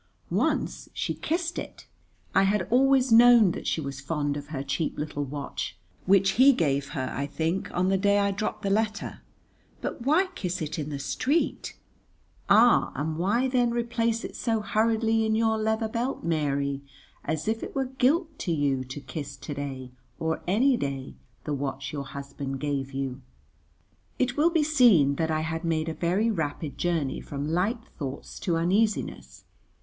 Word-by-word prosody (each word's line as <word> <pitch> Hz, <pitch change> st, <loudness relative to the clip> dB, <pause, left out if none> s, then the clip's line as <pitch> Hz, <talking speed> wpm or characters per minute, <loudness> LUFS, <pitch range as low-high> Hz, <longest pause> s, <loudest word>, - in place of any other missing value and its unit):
Once -, -, 0 dB
she -, -, -2 dB
kissed 340 Hz, +1 st, -2 dB
it. -, -, -9 dB, 0.5 s
I -, -, +5 dB
had 195 Hz, -1 st, +1 dB
always 265 Hz, 0 st, +4 dB
known 230 Hz, -3 st, +7 dB
that -, -, -6 dB
she -, -, 0 dB
was 140 Hz, -2 st, -5 dB
fond 145 Hz, 0 st, -1 dB
of 145 Hz, 0 st, -6 dB
her 140 Hz, -3 st, -4 dB
cheap 140 Hz, +4 st, -2 dB
little 150 Hz, -1 st, -3 dB
watch, 140 Hz, +1 st, -5 dB, 0.3 s
which 195 Hz, 0 st, +5 dB
he 280 Hz, +1 st, +8 dB
gave 140 Hz, -, 0 dB
her, 130 Hz, -1 st, -2 dB
I 140 Hz, +1 st, -2 dB
think, 165 Hz, +5 st, -2 dB
on 185 Hz, +1 st, +1 dB
the 195 Hz, 0 st, +2 dB
day 200 Hz, +1 st, +3 dB
I 200 Hz, 0 st, +2 dB
dropped 210 Hz, +2 st, -3 dB
the 195 Hz, -, 0 dB
letter, 215 Hz, +1 st, -1 dB, 0.6 s
but -, -, -5 dB
why 310 Hz, +10 st, +3 dB
kiss 185 Hz, -, -3 dB
it 155 Hz, 0 st, -4 dB
in 150 Hz, 0 st, -3 dB
the 145 Hz, -, -4 dB
street? 265 Hz, -, -1 dB, 0.7 s
Ah, 230 Hz, +4 st, +5 dB
and 155 Hz, +2 st, -2 dB
why 220 Hz, +9 st, +2 dB
then 250 Hz, -2 st, +2 dB
replace 235 Hz, -1 st, 0 dB
it -, -, -7 dB
so 225 Hz, -3 st, 0 dB
hurriedly 225 Hz, +1 st, +2 dB
in 220 Hz, 0 st, +1 dB
your 220 Hz, 0 st, +2 dB
leather 220 Hz, +1 st, 0 dB
belt, 235 Hz, +4 st, -3 dB
Mary, 140 Hz, -4 st, 0 dB, 0.4 s
as 155 Hz, +3 st, -3 dB
if 225 Hz, +1 st, 0 dB
it -, -, -7 dB
were 270 Hz, -1 st, +1 dB
guilt 290 Hz, +5 st, +1 dB
to 175 Hz, -, -2 dB
you 140 Hz, -4 st, +1 dB
to 130 Hz, +3 st, -7 dB
kiss 145 Hz, 0 st, -6 dB
to 150 Hz, -, -6 dB
day, 135 Hz, -3 st, -6 dB, 0.3 s
or 160 Hz, 0 st, -2 dB
any 245 Hz, +8 st, +3 dB
day, 135 Hz, -, -4 dB, 0.3 s
the 150 Hz, -, -3 dB
watch 135 Hz, 0 st, -4 dB
your 140 Hz, -2 st, -4 dB
husband 140 Hz, 0 st, -6 dB
gave 140 Hz, -2 st, -2 dB
you? 135 Hz, -1 st, -4 dB, 1.0 s
It 250 Hz, -1 st, 0 dB
will 310 Hz, +3 st, +4 dB
be 330 Hz, -3 st, +2 dB
seen 230 Hz, -, +5 dB
that 160 Hz, -1 st, 0 dB
I 155 Hz, 0 st, 0 dB
had 160 Hz, +1 st, -3 dB
made 165 Hz, -1 st, 0 dB
a -, -, -3 dB
very 190 Hz, +8 st, +1 dB
rapid 155 Hz, -5 st, -3 dB
journey 165 Hz, -6 st, -1 dB
from 140 Hz, 0 st, -5 dB
light 210 Hz, +7 st, 0 dB, 0.2 s
thoughts 140 Hz, -2 st, -6 dB
to 170 Hz, -3 st, 0 dB
uneasiness. 200 Hz, +6 st, 0 dB
175 Hz, 175 wpm, -27 LUFS, 145-230 Hz, 1.0 s, he